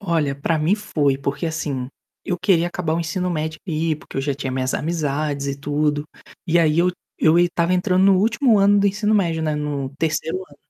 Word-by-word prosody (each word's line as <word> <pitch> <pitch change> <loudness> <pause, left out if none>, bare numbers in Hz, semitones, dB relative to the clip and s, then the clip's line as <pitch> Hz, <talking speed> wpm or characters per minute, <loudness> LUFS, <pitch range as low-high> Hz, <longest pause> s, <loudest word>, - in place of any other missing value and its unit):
Olha, 165 -7 0
para 155 +3 -1
mim 160 +6 +2
foi. 150 -10 0
Porque 140 +4 -3
assim, 150 -5 -3 0.4
eu 180 -3 -1
queria 180 -2 +3
acabar 175 -2 -2
o 165 - 0
ensino 180 +2 -2
médio 155 -1 -3
e 160 -2 -1
porque - - -12
eu - - +1
já 140 +1 -1
tinha 135 -1 -4
minhas 130 0 -1
amizades 150 -3 -2
e 140 0 -2
tudo. 145 +1 0 0.4
E 170 0 +3
aí 160 -1 +3
eu 180 +1 +4 0.3
eu 160 +1 +4
estava 175 0 +2
entrando 185 0 +2
no 195 -1 +5
último 225 +2 +3
ano 200 +1 +4
do 200 - +3
ensino 210 +2 0
médio, 170 -6 +1
né, 155 -1 -1
no 145 -2 -3
3º 160 +1 -1
ano. 185 -6 -12
160 Hz, 205 wpm, -21 LUFS, 145-180 Hz, 0.4 s, no